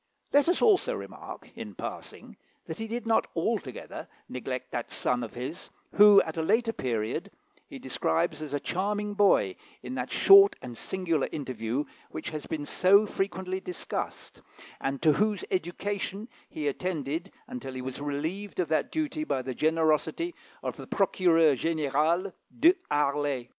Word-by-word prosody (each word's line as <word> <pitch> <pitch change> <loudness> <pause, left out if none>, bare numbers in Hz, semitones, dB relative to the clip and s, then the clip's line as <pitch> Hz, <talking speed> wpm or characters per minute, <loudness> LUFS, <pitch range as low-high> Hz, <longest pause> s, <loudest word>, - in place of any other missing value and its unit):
Let 285 +3 +5
us 355 - +2
also 450 +3 +4
remark, - - -9
in - - -8
passing, - - -8 0.3
that - - -6
he 225 - -3
did 235 +2 -4
not 225 -1 +2
altogether 165 - -3 0.2
neglect 125 0 -5
that 120 - -4
son 125 0 0
of 115 - -8
his 135 +9 -6 0.2
who, 205 -1 +9
at 160 0 -7
a - - +1
later 225 +7 +2
period, 115 - -2 0.4
he - - -9
describes 80 - -1
as 145 -2 -4
a - - 0
charming 205 +5 -2
boy, 195 - +3 0.3
in 125 0 -5
that 130 0 -3
short 395 0 +8
and 120 -1 -7
singular 165 +1 -1
interview 130 -2 -2 0.3
which - - -6
has 155 -1 -6
been 150 -2 -3
so 200 +7 +5
frequently 190 -2 -2
discussed, 180 -2 -5 0.4
and 135 +2 -3
to 155 -2 +6
whose 210 +3 0
education 195 +4 -2 0.2
he 150 -2 -3
attended 165 +3 -2 0.2
until 245 - -6
he 130 - -4
was 130 +2 -5
relieved 160 +9 -3
of 180 - 0
that 155 - +1
duty 310 0 -1
by 130 - -1
the 130 0 -4
generosity 160 - +1 0.3
of - - -4
the - - -9
Procureur 170 -6 +4
General, 160 +5 0 0.3
De 335 +6 +7 0.2
Harlay. 145 -3 0
165 Hz, 155 wpm, -28 LUFS, 140-205 Hz, 0.4 s, who